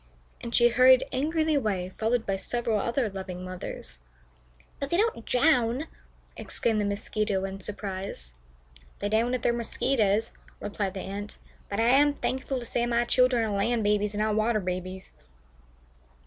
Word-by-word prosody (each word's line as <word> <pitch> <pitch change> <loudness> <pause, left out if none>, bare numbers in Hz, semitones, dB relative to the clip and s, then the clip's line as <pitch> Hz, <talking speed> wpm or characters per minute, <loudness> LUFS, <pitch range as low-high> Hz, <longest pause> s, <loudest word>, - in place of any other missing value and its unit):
and 235 0 -3
she 240 0 +6
hurried 255 +2 +6
angrily 315 +4 +1
away, 195 -9 -1
followed 225 +1 0
by 195 - 0
several 230 +2 -1
other 235 +3 0
loving 190 -2 -6
mothers. 180 - -6 0.8
"But 280 - -3
they 345 - +2
don't 420 - 0
drown," 250 -1 +3 0.5
exclaimed 220 -2 -1
the - - 0
Mosquito, 200 -1 -1
in 195 0 -6
surprise. 190 - -5 0.6
"They 205 - -2
don't 230 +4 +2
if 250 - -4
they're 235 - +3
Mosquitoes," 225 -2 +1 0.3
replied 205 -1 -3
the 190 - -4
Ant, 200 +2 -6 0.3
"but 200 - -2
I 230 +1 +4
am 285 +3 +5
thankful 265 -1 -2
to 240 - -7
say 240 +1 -1
my 240 0 +2
children 250 -1 +3
are 210 -2 -2
land 225 +3 +1
babies 210 0 +1
and 210 - +1
not 215 0 +1
water 220 +1 +2
babies." 185 0 -5
220 Hz, 160 wpm, -27 LUFS, 200-245 Hz, 0.8 s, she